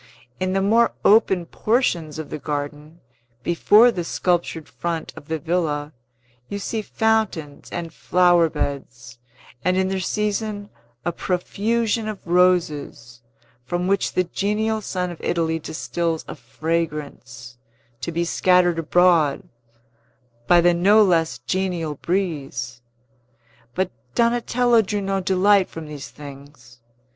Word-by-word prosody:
In 185 0 -1
the 195 0 +1
more 230 +4 +3
open 195 -4 +4
portions 170 - 0
of 160 -2 -7
the - - -4
garden, 150 +2 -5 0.4
before 210 - +5
the 175 -6 -3
sculptured 170 -2 -1
front 170 -2 -4
of 145 - -12
the 160 - -1
villa, 155 -3 -2 0.6
you 200 - -3
see 215 +2 -3
fountains 215 -10 -1
and 165 -2 -5
flower 175 -1 +3
beds, 130 -5 -5 0.4
and 180 +1 +2
in 190 0 +1
their 190 0 -1
season 210 +1 -2 0.3
a 175 - +1
profusion 215 +6 -1
of 215 -1 -4
roses, 165 -9 +1 0.4
from 175 +8 -2
which 195 +1 0
the 185 - +2
genial 210 +4 -1
sun 180 -3 -3
of 170 - -10
Italy 165 -1 0
distils 165 +1 -3
a - - -6
fragrance, 145 -7 -4 0.4
to 170 - -4
be 170 +1 -1
scattered 175 -1 +3
abroad 165 -3 +3 1.0
by 175 -1 +6
the 175 0 +4
no 200 +5 +5
less 165 -7 +2
genial 170 +3 -2
breeze. 140 -8 -3 0.9
But 185 0 0 0.2
Donatello 240 0 +3
drew 205 0 -2
no 195 0 -1
delight 190 +1 +3
from 165 -1 -8
these 150 -2 -8
things. 140 -3 -13
175 Hz, 125 wpm, -22 LUFS, 155-195 Hz, 1.0 s, by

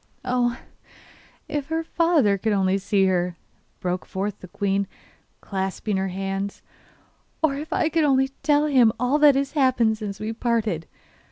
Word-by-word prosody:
'Oh! 245 -1 +1 0.9
if 295 -3 -3
her 325 0 -1
father 325 -11 +2
could 220 +2 0
only 195 0 +2
see 195 0 +2
her!' 180 -2 0 0.4
broke 180 0 -2
forth 200 +1 -4
the 185 - -10
queen, 200 +1 -1 0.5
clasping 195 +1 -2
her 190 0 0
hands. 195 +1 -4 0.8
'Or 310 -3 +3
if 295 +3 -6
I - - +2
could 325 0 +1
only 270 -2 +3
tell 295 -1 +3
him 255 -6 +5
all 250 +5 +2
that 295 -2 +7
has 275 0 0
happened 245 -6 +2
since 200 -2 -5
we 215 +1 -3
parted. 220 -8 -1
220 Hz, 155 wpm, -24 LUFS, 195-275 Hz, 0.9 s, that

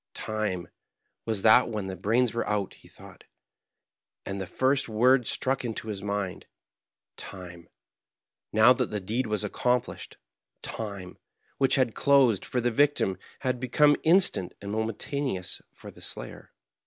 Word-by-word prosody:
" - - -64
Time, 105 -5 -3 0.6
was 110 -3 -1
that 115 +3 +6
when 105 -3 -3
the 95 -1 -5
brains 115 +5 +1
were 115 - -2
out," 105 -2 -1
he - - -18
thought; - - -15 1.0
and 100 0 -4
the 95 - -5
first 130 +3 +1
word 125 +2 +3
struck 130 0 +1
into 110 -2 -4
his 100 -2 -5
mind. 100 -2 -4 0.7
Time, 90 -3 -10 0.8
now 110 +4 +6
that 125 -2 -1
the 105 - -3
deed 110 +6 -2
was 105 -1 -1
accom 125 +4 +1
plished - - -10 0.3
— - - -56
time, 100 -4 -7 0.4
which 135 -1 +3
had 130 -4 +1
closed 135 -7 +3
for 125 - -2
the 120 0 0
victim, 125 - +2 0.2
had 130 -2 -1
be 130 0 -4
come 145 +4 +5
instant 165 - +2
and 100 0 -6
momentous 110 -2 -3
for - - -12
the - - -17
slayer. - - -8
110 Hz, 155 wpm, -27 LUFS, 100-125 Hz, 1.0 s, that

